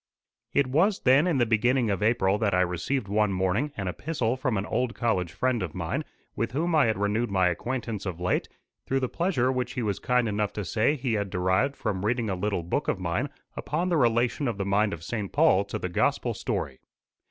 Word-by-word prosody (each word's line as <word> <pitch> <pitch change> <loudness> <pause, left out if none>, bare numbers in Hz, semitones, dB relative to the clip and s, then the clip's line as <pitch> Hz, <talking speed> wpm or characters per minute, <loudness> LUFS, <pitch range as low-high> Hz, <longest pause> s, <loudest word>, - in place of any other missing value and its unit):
It 140 - +3
was, 165 +11 +2
then, 135 +6 +5
in 165 -6 +2
the 120 - +3
beginning 120 +1 +2
of 100 - -2
April 105 -3 +2
that 100 -4 +1
I 90 - +3
received 90 +8 -1
one 105 0 +2
morning 95 +10 0
an 100 -2 -3
epistle 125 - -1
from 130 -4 -1
an 95 - -2
old 125 0 -1
college 95 -8 0
friend 125 +6 0
of 90 -5 -4
mine, - - -2 0.3
with 115 0 -2
whom 165 +5 0
I 150 -6 +5
had 110 - 0
renewed 105 +4 0
my 95 -2 +3
acquaintance 115 +1 -3
of 90 -2 -4
late, 90 0 0 0.4
through 135 0 +1
the 130 - +1
pleasure 145 -6 0
which 125 -1 -2
he 125 - -2
was 100 -3 -1
kind 125 -1 +1
enough 105 -1 -1
to 105 - -4
say 115 - +1
he 130 -4 -2
had 100 -2 -1
derived 95 +10 +1
from 100 -5 -3
reading 115 -1 0
a - - -1
little 100 -1 -1
book 115 - -2
of - - +1
mine 90 +10 -1 0.3
upon 170 +5 -2
the 170 - +2
relation 120 +2 +2
of 115 -4 -2
the 100 - -2
mind 100 +2 +2
of 85 -3 -6
St. 105 +1 -4
Paul 145 -11 +4
to 100 - -4
the - - -3
gospel 90 - 0
story. 65 - -3
110 Hz, 220 wpm, -27 LUFS, 95-130 Hz, 0.4 s, then